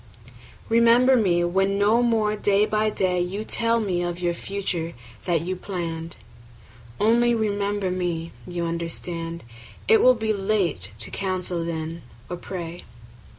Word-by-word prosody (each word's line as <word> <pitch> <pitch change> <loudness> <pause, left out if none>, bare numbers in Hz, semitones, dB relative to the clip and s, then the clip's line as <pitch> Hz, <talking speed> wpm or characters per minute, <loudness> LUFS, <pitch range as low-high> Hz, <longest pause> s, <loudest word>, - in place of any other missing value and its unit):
Remember 235 +3 +5
me 180 -7 +3
when 195 +3 +1
no 210 +4 +4
more 220 -3 +2
day 205 0 +3
by 215 0 +1
day 180 -3 0
5 175 - -1
You 205 +2 -3
tell 230 +1 +1
me 185 -5 -1
of 175 0 -3
our 175 0 +1
future 175 -3 -3 0.3
that 170 -3 +1
you 185 +3 -3
plann'd: 170 -3 -5 0.8
Only 235 +2 +4
remember 205 -3 -1
me; 175 -2 -2 0.2
you 175 -1 -3
understand 170 0 -4 0.4
It 445 -1 +6
will 255 0 +6
be 220 -1 0
late 195 - -1
to 110 - -7
counsel 185 -3 -2
then 165 0 -4 0.3
or 180 - -3
pray. 175 -1 -6
185 Hz, 145 wpm, -24 LUFS, 170-215 Hz, 0.8 s, It